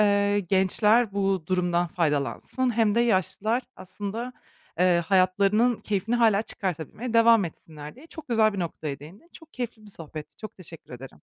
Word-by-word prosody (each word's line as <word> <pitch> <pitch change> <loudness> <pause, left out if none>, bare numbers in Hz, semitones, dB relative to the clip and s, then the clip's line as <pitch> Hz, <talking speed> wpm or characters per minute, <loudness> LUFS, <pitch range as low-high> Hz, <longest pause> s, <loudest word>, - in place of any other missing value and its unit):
eee, 205 0 +3
gençler 200 +4 +2
bu 195 -4 -1
durumdan 175 -1 +1
faydalansın 165 - -1
hem 220 -2 +3
de 235 - +3
yaşlılar 220 +2 0
aslında, 210 +6 -6 0.5
eee, 180 -1 +3
hayatlarının 200 +6 +3
keyfini 210 +3 -2
hâlâ 220 -3 +3
çıkartabilmeye 195 - -4
devam 230 -3 +6
etsinler, 150 -2 -9
diye 300 +5 -14
çok 320 -4 -12
güzel 220 -2 +3
bir 200 - -6
noktaya 155 -4 -4
değindin. 180 - -14
Çok 320 -1 -15
keyifli 240 -3 -5
bir 205 - -13
sohbetti, 155 -4 -9
çok 215 0 -10
teşekkür 165 -7 -12
ederim. 125 - -12
200 Hz, 155 wpm, -26 LUFS, 175-225 Hz, 0.5 s, devam